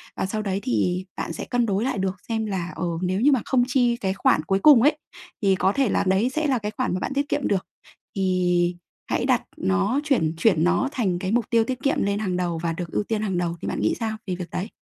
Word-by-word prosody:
Và - - -1
sau 215 +3 -3
đấy 195 -2 -2
thì 180 - 0
bạn - - -3
sẽ - - -6
cân 245 -1 +1
đối 200 -1 0
lại 265 - -1
được 190 -1 -1
xem 220 -1 -1
là, 185 -4 -3
ờ, 180 - -3 0.2
nếu 185 +2 0
như 285 +4 +5
mà 260 - +2
không 255 -2 +2
chi 245 -2 +2
cái 190 -4 -1
khoản 155 -5 +2
cuối 195 +4 +1
cùng 275 -1 +7
ấy, 295 +3 +4 0.4
thì 195 -2 +3
có 190 - +2
thể 270 -5 +1
là - - +1
đấy 195 +7 +2
sẽ 310 +3 -1
là 260 -4 +1
cái 210 -1 -4
khoản - - 0
mà 185 - -1
bạn - - -3
tiết 280 0 0
kiệm - - 0
được, 190 -2 -1 0.5
thì 180 -2 +1 0.4
hãy - - +1
đặt - - +2
nó 95 - +1
chuyển 245 - +1
chuyển 165 -4 +3
nó 260 +10 +2
thành 195 -10 -1
cái 185 +2 -2
mục 235 -2 0
tiêu 230 -1 +4
tiết 255 +2 -4
kiệm 275 - +1
lên 200 +1 0
hàng 185 -4 -1
đầu 175 -2 -1
và 165 -1 0
được 170 -1 -6
ưu - - 0
tiên 215 0 -2
hàng 195 -4 -1
đầu. 170 -1 -1
Thì - - -4
bạn - - -2
nghĩ 110 - +1
sao 220 -1 -2
về 185 - -1
việc 180 -1 -7
đấy? 195 +5 -3
195 Hz, 265 wpm, -24 LUFS, 180-235 Hz, 0.5 s, cùng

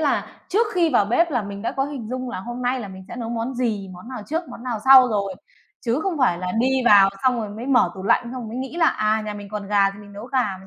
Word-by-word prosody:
là 295 -3 +1 0.2
trước 440 +4 +2
khi 340 -2 +3
vào 235 -7 +4
bếp 330 +11 +2
là 245 -6 0
mình 200 0 -7
đã - - -2
có 270 - 0
hình 275 -6 -6
dung 255 0 -4
là 185 - -5
hôm 240 +5 -6
nay 250 +1 0
là 205 - -6
mình 190 0 -10
sẽ - - -8
nấu 230 -2 -4
món 235 +2 -3
gì, 220 -6 -2
món 180 +6 -12
nào 255 -4 -6
trước, 325 +2 -3
món 235 - -10
nào 240 -4 -3
sau 265 -1 +8
rồi. 200 -3 -1 0.5
Chứ 240 +4 0
không 370 -5 -2
phải 210 -10 +2
là 180 0 -3
đi 235 +3 +1 0.2
vào 200 -3 +7
xong 250 -2 +2
rồi 215 - -4
mới 225 +5 -7
mở 250 -9 +3
tủ 190 - -8
lạnh, 200 - +3
xong 235 - -7
rồi 245 -4 -6
mới 235 - -6
nghĩ 265 +5 -5
là, 335 -1 +4
à, 215 -3 +1
nhà 210 - -4
mình 205 -1 -9
còn 210 -1 -5
gà 200 -1 +3
thì 200 - -12
mình 205 0 -13
nấu 205 +3 -8
gà, 260 0 -1 0.2
mà 190 - -15
235 Hz, 305 wpm, -22 LUFS, 205-260 Hz, 0.5 s, sau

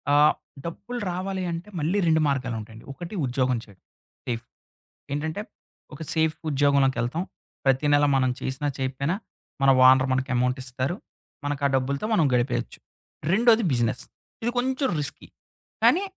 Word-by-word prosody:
ఆ! - - +6 0.5
డబ్బులు 240 +8 -5
రావాలి 190 +1 -3
అంటే 170 +5 -5
మళ్ళీ 170 +7 +1
2 160 -1 +4
మార్గాలుంటాయండి. 115 -5 -3
ఒకటి 175 +8 -7
ఉద్యోగం 125 -1 +1
చేయడం, 100 -3 -19 0.4
సేఫ్. 120 -1 -3 0.7
ఏంటంటే, 155 +6 -2 0.5
ఒక 160 - -8
సేఫ్ 160 -1 +2 0.2
ఉద్యోగంలోకెళ్తాం. 140 0 +2 0.4
ప్రతి 135 +2 +3
నెల 145 0 +5
మనం 130 -1 +2
చేసినా, 135 +3 -2
చెయకపోయినా, 135 +6 -1 0.5
మన 135 - +6 0.2
ఓనరు 130 0 +6
మనకి 130 +1 0
అమౌంటిస్తారు. 130 +5 -1 0.5
మనకు 145 -1 -2
ఆ - - +3
డబ్బులతో 140 +7 0
మనం 165 - +4
గడిపేయొచ్చు. 120 -1 0 0.5
రెండోది 230 +1 +5
బిజినెస్. 120 -2 0 0.4
ఇది 240 - +2
కొంచెం 260 +2 +1
రిస్కి. 145 0 -6 0.6
కానీ, 380 +4 +5
140 Hz, 130 wpm, -25 LUFS, 130-170 Hz, 0.7 s, ఆ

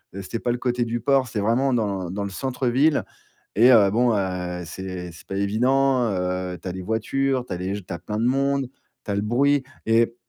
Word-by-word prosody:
Heu, 100 - -5
c'était 115 +5 -4
pas 120 - -1
le 120 - -1
côté 125 -1 0
du 120 +1 -2
port, 135 -1 +3
c'est 110 - -3
vraiment 125 +5 +2
dans 100 -6 -1
dans 100 +1 -3
le - - -4
centre-ville 130 +5 +1 0.5
et 125 +4 +7
heu, 100 -4 +6
bon, 120 +1 +3
heu, 90 -2 -2
c'est 90 0 -6
c'est 85 - -15
pas 95 - -5
évident, 125 +6 +2
heu, 90 0 -2
tu - - -5
as - - -3
les 95 0 -6
voitures, 125 +5 0
tu - - -6
as - - -4
les 95 +2 -2
g 100 - -7
tu - - -7
as - - -5
plein 105 +4 -5
de 115 - +1
monde, 140 0 +1 0.4
tu - - -5
as - - 0
le 100 - 0
bruit 135 +5 +2 0.2
et 115 +1 +3
115 Hz, 235 wpm, -24 LUFS, 95-130 Hz, 0.5 s, et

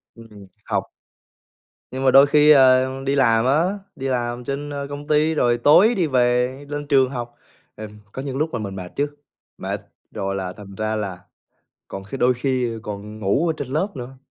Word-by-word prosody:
Ừm, 110 -3 -14 0.2
học. - - -2 1.0
Nhưng 130 +1 -4
mà 130 - +4
đôi 135 +2 +7
khi, 150 +1 +5
ờ, 130 -2 +6 0.2
đi 140 +1 0
làm 115 -3 +3
á, 170 +9 +1 0.2
đi 135 - -4
làm 120 -1 -2
trên, 140 +3 -4
ơ, 140 -1 -5
công 145 +1 -7
ty 155 +1 +2
rồi 120 -6 +2
tối 175 - +5
đi 175 -4 +1
về 125 -1 +1
lên 145 0 -5
trường 135 -3 +3
học, 120 -2 -6 0.4
ừm, 105 0 -10
có 130 - -6
những 135 -1 -5
lúc 155 0 -1
là 120 - -2
mình 100 -2 -5
mệt 90 -2 -7
chứ, 145 - 0 0.5
mệt! - - -4 0.3
Rồi 95 0 -3
là 95 -1 -4
thành 100 -2 -12
ra 110 +2 -2
là 100 -4 -4 0.7
còn 95 0 -7
khi 100 +7 -7
đôi 125 0 +3
khi 125 -1 -1
còn 105 0 -7
ngủ 110 - +1
ở - - +2
trên 140 - -5
lớp 155 +9 0
nữa. 130 +1 -8
130 Hz, 195 wpm, -22 LUFS, 110-145 Hz, 1.0 s, đôi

